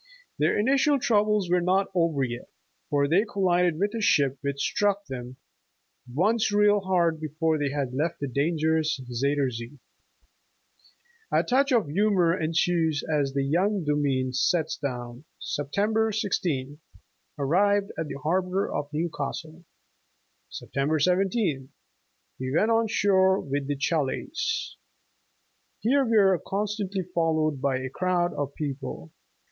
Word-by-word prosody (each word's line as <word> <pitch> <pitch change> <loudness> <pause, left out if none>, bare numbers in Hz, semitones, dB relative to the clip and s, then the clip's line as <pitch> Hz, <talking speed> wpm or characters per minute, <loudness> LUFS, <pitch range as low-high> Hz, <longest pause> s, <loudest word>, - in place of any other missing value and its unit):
Their - - +2
initial 275 +6 +3
troubles 210 -5 +2
were 180 0 +2
not 190 +2 +1
yet - - -32
over, 165 -6 +1 0.6
for 140 -1 +2
they 175 +7 +3
collided 180 -5 +1
with 205 +4 0
a 230 - -3
ship, 140 -8 +2
which 140 -1 -3
struck 205 +5 0
them 125 -1 -7 0.7
''once 210 - +1
real 205 0 +4
hard 175 -4 +1
before 155 +1 -1
they 145 -1 0
had 140 -3 -3
left 155 +5 -1
the 140 - -3
danger 155 +4 +1
ous 155 -2 -1
Zuyder 130 +2 -1
Zee." 120 +4 -8 1.5
A - - +3
touch 275 +3 +2
of 230 - +3
humor 180 0 +2
ensues 160 -2 0
as 140 -2 0
the 140 0 0
young 185 +7 +1
Domine 140 -4 0
sets 155 +5 +1
down: 125 -2 -5 0.2
''Sept. 145 -1 -4
16th. 200 -10 0 0.6
Arrived 200 +8 +2
at 160 - -3
the - - -6
harbor 185 +4 0
of 145 - -3
New 160 +3 -1
Castle. 160 +4 -6 0.9
Sept. - - -10
17th. 160 - +1 0.7
We 130 0 -3
went 220 +5 +2
on 225 0 +3
shore 190 -2 +3
with 140 0 -3
the 145 - -1
'Cha 155 +3 +1
laise.' 360 - -3 1.0
Here 275 +5 +3
we 230 -3 +2
were 190 -4 +4
constantly 200 -1 -2
followed 160 -5 0
by 135 -2 +1
a 130 0 -5
crowd 180 +2 0
of 145 -1 -4
people. 135 - -5
165 Hz, 140 wpm, -26 LUFS, 140-200 Hz, 1.5 s, real